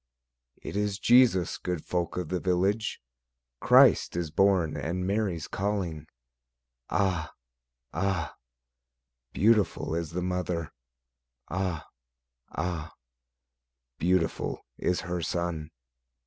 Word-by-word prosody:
It - - -6
is 105 -1 0
Jesus, 115 -6 +4
good 90 -4 -3
folk 85 -1 -2
of 90 -4 -3
the 90 - -1
village; 95 +5 0 0.6
Christ - - +6
is 85 -3 -2
born, 95 -2 +3
and 90 +4 -2
Mary's 95 -5 -1
calling; 95 -7 -2 0.8
Ah! 90 -5 0 0.6
Ah! 95 -5 -1 1.0
beautiful 105 -5 +2
is 85 -1 -2
the 90 +3 -3
mother; 90 -3 -2 0.8
Ah! 90 -3 -2 0.7
Ah! 80 -1 -3 1.0
beautiful 90 -1 0
is 90 - 0
her 90 -1 -3
son. 85 -2 -2
90 Hz, 95 wpm, -28 LUFS, 85-95 Hz, 1.0 s, Christ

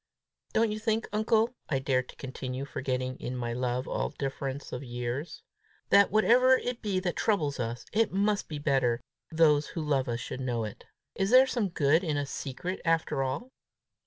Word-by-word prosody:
"Don't 225 -1 +3
you 215 - -3
think, 220 0 0
uncle," 220 +2 +2 0.2
I 140 - +1
dared 130 -1 0
to - - -11
continue, 130 0 -5
forgetting 130 -1 -3
in 125 - -4
my 120 -1 -2
love 125 +1 -1
all - - -1
difference 135 0 -4
of 125 - -4
years, 120 +4 -4 0.5
"that, 200 0 +6
whatever 250 +5 +5
it 245 -1 -4
be 200 -4 0
that 180 -2 -1
troubles 150 -11 0
us, 120 +1 -3
it 225 +1 +2
must 200 +1 +1
be 155 - -5
better 135 -5 +1 0.3
those 155 -2 +4
who 165 - -5
love 140 -3 +1
us 115 0 -1
should 130 - -5
know 120 -3 -1
it? 105 - -7 0.3
Is 195 - 0
there 255 +2 +8
some 235 -6 -1
good 160 +1 +3
in 155 -4 0
a 145 - -1
secret 140 +7 -5
after 165 -4 +1
all?" 135 - -3
145 Hz, 185 wpm, -29 LUFS, 130-205 Hz, 0.5 s, there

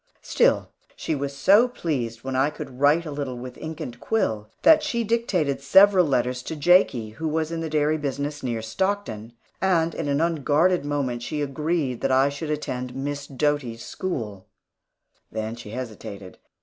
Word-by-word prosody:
Still, - - +2 0.3
she - - -3
was 140 -1 -3
so 200 - +6
pleased 130 - -3
when 135 0 -3
I 135 +3 +3
could 130 -3 -9
write 150 +4 +4
a 155 - -5
little 140 -3 -4
with 125 +1 -8
ink 160 -1 -6
and 120 - -6
quill, 110 - -1
that 315 -1 +7
she 255 -6 -1
dictated 195 -12 0
several 190 +4 +6
letters 125 -2 0
to 160 - -5
Jakie, 145 - +3
who 160 +8 -4
was 160 +1 -1
in 165 -1 -3
the 160 - -3
dairy 155 0 +1
business 145 +1 -3
near 115 -3 -3
Stockton; 120 - -2 0.3
and 170 -3 +2
in - - -3
an 140 0 +1
unguarded 165 +2 +2
moment 135 -5 -2
she 150 +4 -3
agreed 145 -2 -1
that 135 - +1
I 135 +2 +4
should 145 +2 -5
attend 125 -4 -3
Miss 140 +1 -4
Doty's 135 -5 -1
school. 110 - -5 0.8
Then 110 +1 -3
she 120 -3 -10
hesitated. 110 -5 -7
145 Hz, 170 wpm, -24 LUFS, 125-165 Hz, 0.8 s, that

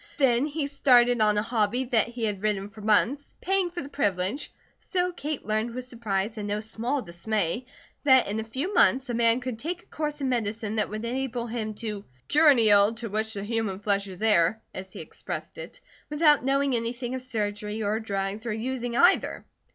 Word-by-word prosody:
Then 265 -1 +3
he 300 0 -2
started 245 -4 +4
on 210 -1 +3
a 210 - +2
hobby 225 +2 0
that 240 -4 +2
he 235 -1 -6
had 205 -3 -1
ridden 205 -1 -1
for 215 - -12
months, 225 +7 +1
paying 385 -1 +1
for 345 -2 -6
the - - -8
privilege, 205 -1 -1 0.3
so 360 -1 -1
Kate 305 -4 -5
learned 220 +2 -1
with 255 0 -4
surprise 220 -3 -3
and 205 - -4
no 205 +1 -1
small 230 +5 -3
dismay 200 +5 -2 0.4
that 260 -3 +5
in 210 +2 -2
a - - -2
few 265 - -4
months 265 -7 +4
a - - -3
man 230 +1 +3
could 250 -3 -5
take 345 +6 -4
a - - -28
course 300 -1 -4
in 275 - -1
medicine 220 -3 -2
that 210 - +1
would 215 +2 -5
enable 245 -1 -2
him 220 -2 -4
"to 210 -2 -5 0.2
cure 305 +1 +5
any 235 -6 +5
ill 205 +2 +5
to 230 0 -5
which 220 +1 -1
the 200 - -4
human 220 -3 -2
flesh 200 0 0
is 190 +2 -8
heir," 210 -1 +3
as 190 0 -8
he - - -8
expressed - - -7
it, - - -9 0.3
without 295 -1 +4
knowing 275 0 +2
anything 240 +2 -2
of 260 - -3
surgery, 210 -3 -3
or 210 +2 0
drugs, 200 +1 -3
or 220 - -1
using 240 +1 -3
either. 355 +7 +3
230 Hz, 205 wpm, -26 LUFS, 210-260 Hz, 0.4 s, that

